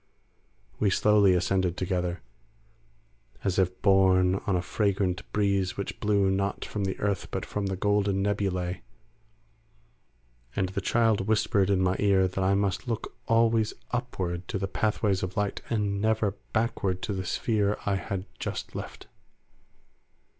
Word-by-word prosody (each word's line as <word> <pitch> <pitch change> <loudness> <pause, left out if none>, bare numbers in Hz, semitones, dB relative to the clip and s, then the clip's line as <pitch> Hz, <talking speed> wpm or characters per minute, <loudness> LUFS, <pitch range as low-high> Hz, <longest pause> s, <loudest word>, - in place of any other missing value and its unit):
We 105 - +3
slowly 100 -1 +4
ascended 90 0 +1
together, 90 -1 -2 1.2
as 95 -1 0
if 90 -1 0
borne 95 -2 +5
on 100 - +2
a 90 - +1
fragrant 95 -3 -1
breeze 100 -3 +1
which 100 - -4
blew 100 -2 +2
not 100 +1 -1
from 105 -2 -3
the 95 - -3
earth 100 -2 -1
but - - -3
from 100 -1 -3
the 95 - -2
golden 100 0 +1
nebulae, 95 -3 -1 1.7
and 95 -1 0
the 100 +1 -3
child 110 -1 +2
whispered 105 -2 +2
in 95 -2 +2
my 95 0 +1
ear 95 -2 +4
that 95 +1 -2
I 95 +1 +3
must 100 +4 -1
look 115 -2 -4
always 115 -1 +3 0.2
upward 95 -8 -3
to - - -2
the 95 0 -2
pathways 105 -1 0
of 90 0 -4
light, 105 -1 -1
and 100 -3 0
never 110 -1 +2 0.2
backward 100 -5 -1
to 105 - -2
the 95 -1 -3
sphere 105 +2 0
I 100 -1 +1
had 95 -1 -4
just - - -4
left. - - -7
100 Hz, 145 wpm, -27 LUFS, 95-105 Hz, 1.7 s, borne